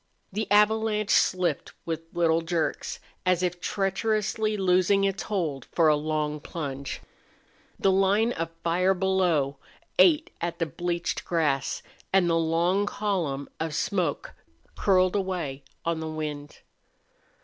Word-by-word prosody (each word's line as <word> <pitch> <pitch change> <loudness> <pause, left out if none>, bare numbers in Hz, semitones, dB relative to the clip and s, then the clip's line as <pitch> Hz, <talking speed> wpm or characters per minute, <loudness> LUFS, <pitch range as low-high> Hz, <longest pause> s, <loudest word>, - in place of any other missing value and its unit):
The 215 +1 -2
avalanche 210 0 +3
slipped 180 -1 +2
with 165 -1 -2
little 165 -1 +2
jerks, 165 -1 -2 0.2
as 180 -1 +2
if 180 0 -1
treacherously 215 +2 0
loosing 190 +1 +3
its 195 -1 0
hold 160 - -2
for 165 -2 +3
a 150 - +5
long 150 0 -1
plunge. 140 -3 -5 0.8
The 195 - +3
line 195 +4 +3
of 165 -6 -3
fire 180 +3 +2
below 175 -7 +1 0.4
ate 330 0 +5
at 170 0 -2
the 165 - 0
bleached 175 +3 -3
grass 145 -6 0 0.3
and 190 -2 +4
the 165 - +2
long 170 +5 +2
column 175 -11 -2
of 160 -2 -2
smoke 175 -3 -1 0.4
curled 185 -1 +3
away 180 -9 -2 0.2
on 165 -1 0
the 160 0 -4
wind. 150 -2 -5
175 Hz, 125 wpm, -27 LUFS, 160-195 Hz, 0.8 s, a